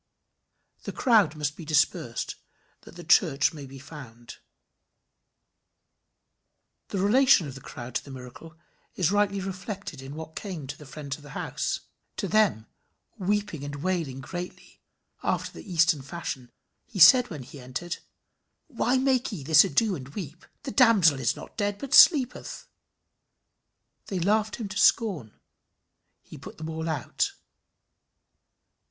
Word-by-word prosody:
The - - -6
crowd 215 - +3
must 150 -1 -2
be 170 - -9
dispersed 145 -6 0 0.5
that - - -15
the 175 - -9
church 155 -4 +3
may 145 -3 -9
be 135 +1 -11
formed. 130 -5 -11 2.5
The - - -4
relation 215 - +4
of 135 - -7
the 135 - -11
crowd 120 0 -9
to - - -2
the - - -13
miracle 135 +5 -11 0.4
is 180 -1 +1
rightly 205 -1 +1
reflected 190 - -6
in 135 +2 -9
what 160 0 -8
came 180 -9 -6
to 140 +2 -6
the 150 -1 -14
friends 140 0 -6
of - - -17
the 145 0 -9
house. - - -3 0.4
To - - -2
them, 210 - +2 0.5
weeping 200 -6 -1
and 145 0 -5
wailing 165 -8 -2
greatly, 175 +6 -8 0.4
after - - -1
the 195 - -11
Eastern 165 -3 +3
fashion, 130 -4 -6 0.4
he 230 - -9
said 245 +8 +8
when 150 -6 -7
he 135 +3 -12
entered, 130 +8 -5 0.7
"Why 250 -2 0
make 260 -2 +1
ye 175 -10 -6
this 155 +2 +7
ado, 195 +3 +1
and 130 -4 -9
weep? 170 -4 -8 0.2
The 270 - -5
damsel 205 - +5
is 125 - +1
not - - -12
dead, 205 -2 -1
but 275 +3 -6
sleepeth." 260 -7 +5 1.4
They 195 - -3
laughed 210 +4 +1
him 225 - -5
to 190 - -6
scorn. 180 - +2 0.8
He - - -12
put - - -11
them 160 +1 -6
all 160 +1 -4
out. 145 -6 -1
165 Hz, 145 wpm, -27 LUFS, 140-205 Hz, 2.5 s, said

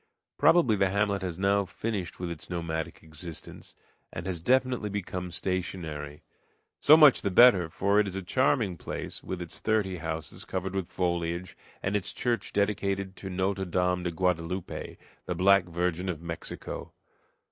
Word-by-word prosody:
Probably 150 -11 +5
the 95 -1 +2
hamlet 100 0 +1
has 90 -3 -4
now 100 +1 +2
finished 95 -1 -4
with 90 -1 -3
its 85 - -7
nomadic 85 -2 -4
existence, 80 +1 -10 0.4
and 85 - -6
has 90 -3 -3
definitely 125 +1 +2
become 90 -2 -4
stationary. 80 -5 -3 0.6
So 155 +2 +8
much 150 -4 +7
the 100 - 0
better; 95 -4 +6
for 100 +5 +2
it 105 - +3
is 95 - -5
a 95 - -3
charming 110 -3 +1
place, - - -6
with 90 -1 -4
its 85 - -6
thirty 105 -4 0
houses 80 -1 -5
covered 95 0 -3
with 95 -3 -2
foliage, 85 0 -2 0.3
and 95 +2 0
its 105 - -2
church 120 -2 -1
dedicated 100 -1 0
to 95 - -6
Notre 95 +1 -1
Dame 90 0 +1
de 90 - -1
Guadaloupe, 90 +1 -2 0.3
the 90 - -1
Black 100 +3 +5
Virgin 90 +1 -1
of 85 -4 -3
Mexico. 85 0 -6
95 Hz, 160 wpm, -28 LUFS, 85-100 Hz, 0.6 s, So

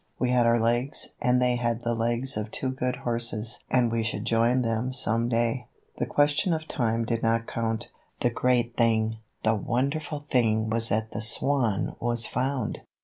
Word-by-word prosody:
We 125 -1 0
had 120 -2 +3
our 115 0 +3
legs 120 +5 +2
and 125 0 +2
they 125 -1 +1
had 120 -1 -1
the 120 0 -1
legs 120 +3 +2
of 105 0 -4
two 130 +4 -2
good 125 -1 -2
horses 115 -1 -1
and 120 -3 +2
we 115 0 0
should 110 -1 -3
join 120 +2 +2
them 115 +2 -2
some 115 -2 +1
day. 120 +1 -1 0.3
The - - -2
question 145 +5 +2
of 155 0 -7
time 115 -1 -1
did 115 0 -2
not 115 0 0
count. 115 0 -3 0.3
The 120 - +1
great 120 -1 0
thing, 110 -1 +1 0.3
the 110 - +3
wonderful 140 +7 -2
thing 110 -3 +1
was 115 0 +1
that 110 +2 -1
the 105 - -5
Swan 115 -1 +2
was 120 -1 +4
found! 125 +1 -2
120 Hz, 180 wpm, -26 LUFS, 115-125 Hz, 0.3 s, was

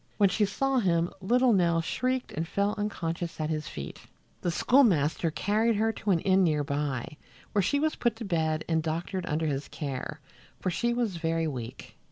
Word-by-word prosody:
When 200 -2 +5
she 210 +3 +2
saw 265 +6 +1
him 170 -5 +1
little 245 +5 +4
Nell 170 -4 +3
shrieked 255 +9 -1
and 160 +2 -3
fell 200 +3 0
unconscious 175 -5 -3
at 155 0 -1
his 155 -1 -2
feet. 70 -1 -7 0.4
The 175 - 0
schoolmaster 170 - +3
carried 215 +7 +1
her 220 +2 +2
to 210 - -4
an 175 -4 +3
inn 190 0 +4
near 155 -4 +2
by, 145 0 -3 0.3
where 205 - +2
she 245 +10 +1
was 310 +1 +1
put 240 -2 +1
to 225 0 -6
bed 160 -4 0
and 160 -1 +2
doctored 170 +3 -3
under 155 +1 0
his 145 -2 -2
care, 135 -4 -5 0.4
for 185 - -1
she 235 +7 0
was 235 -7 -1
very 165 0 0
weak. 125 -4 -7
175 Hz, 190 wpm, -28 LUFS, 155-210 Hz, 0.4 s, When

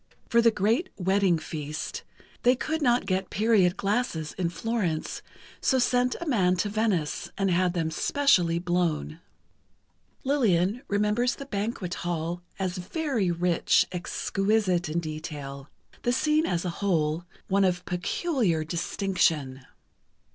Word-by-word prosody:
For 235 -1 +5
the 230 - +6
great 225 - +1
wedding 190 -1 +2
feast, 155 -1 -5 0.4
they 250 +1 +5
could 315 +5 -2
not 245 -3 +3
get 190 0 -1
period 205 -4 +3
glasses 200 -7 -1
in 180 -3 -1
Florence, 180 -3 -2 0.4
so 265 - +3
sent 250 0 +2
a 340 - -5
man 190 - +2
to 205 +3 -1
Venice, 205 -8 -1
and 195 -1 +1
had 180 0 +2
them 165 -3 -1
specially 180 - +2
blown. 170 -3 -1 1.0
Lillian 230 - +2
remembers 210 +5 +1
the 275 - -8
banquet 200 -5 -3
hall 175 0 -2 0.2
as 185 -1 -2
very 235 - -1
rich, 170 0 +2
exquisite 185 0 0
in 170 +2 -1
detail—the 150 - -6
scene 305 +5 +2
as 175 0 -1
a 180 - -1
whole, 165 -4 +1 0.2
one 195 +1 +3
of 180 -1 +1
peculiar 180 - 0
distinction. 160 -5 0
185 Hz, 125 wpm, -27 LUFS, 170-230 Hz, 1.0 s, the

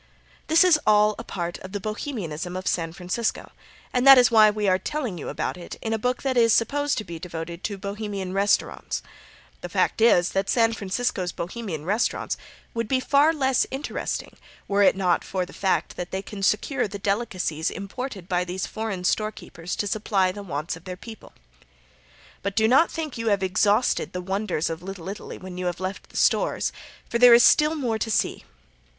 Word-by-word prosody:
This 320 +2 +6
is 355 -4 +5
all 210 0 +5
a - - -5
part 175 -5 -4
of 190 +1 -10
the 205 - -2
Bohemianism 185 - -4
of 185 - -6
San 165 -2 0
Francisco, 180 +6 -3 0.4
and 250 +2 +2
that 270 -1 +11
is 245 -2 +5
why 215 -2 +7
we 210 -1 -1
are 185 0 +3
telling 240 - -3
you - - -5
about - - -3
it 175 - -9
in 225 - -3
a 220 - -1
book 250 +3 -1
that 265 -2 0
is 230 -2 +5
supposed 285 +5 +1
to 215 - -2
be 170 -4 -8
devoted 170 0 -7
to 205 - -2
the 195 - -15
Bohemian 200 -2 -4
restaurants. 200 +1 0 0.6
The - - -6
fact - - 0
is 180 -6 +5
that 195 0 -1
San 230 -1 +3
Francisco's 195 -3 -2
Bohemian 175 -5 -5
restaurants 210 +7 0 0.4
would 230 -1 -2
be 260 +2 +1
far 285 +4 +4
less 265 -5 +1
interesting 270 +3 -4 0.3
were 200 0 +2
it 200 - +5
not 185 -2 +1
for 185 -1 -2
the - - -14
fact 190 -1 -1
that 175 0 -4
they 190 +1 -4
can 205 -1 -8
secure 220 +6 +1
the 200 0 -6
delicacies 195 -6 -1
imported 200 0 -6
by 180 -1 +1
these 180 +1 -4
foreign 215 -5 -4
storekeepers 180 -4 -2
to - - -2
supply 200 -2 +1
the 205 +2 -8
wants 160 -4 -4
of 165 +2 -15
their 180 -1 -6
people. 220 +3 -11 1.1
But 200 0 -3
do 220 0 +4
not 270 +8 +5
think 310 -7 -5
you 230 - -3
have 200 -2 +2
exhausted 205 +5 +2
the 180 - -3
wonders 190 -3 -1
of 165 0 -4
Little 185 -2 -8
Italy 205 - -7
when 185 -1 -8
you 180 - -2
have 175 0 -3
left 185 +1 -5
the - - -9
stores, - - +2 0.4
for 235 - -1
there 245 -1 +9
is 235 - +6
still 305 +1 +5
more 240 -7 -1
to 225 - -2
see. 215 - 0
200 Hz, 200 wpm, -25 LUFS, 185-235 Hz, 1.1 s, that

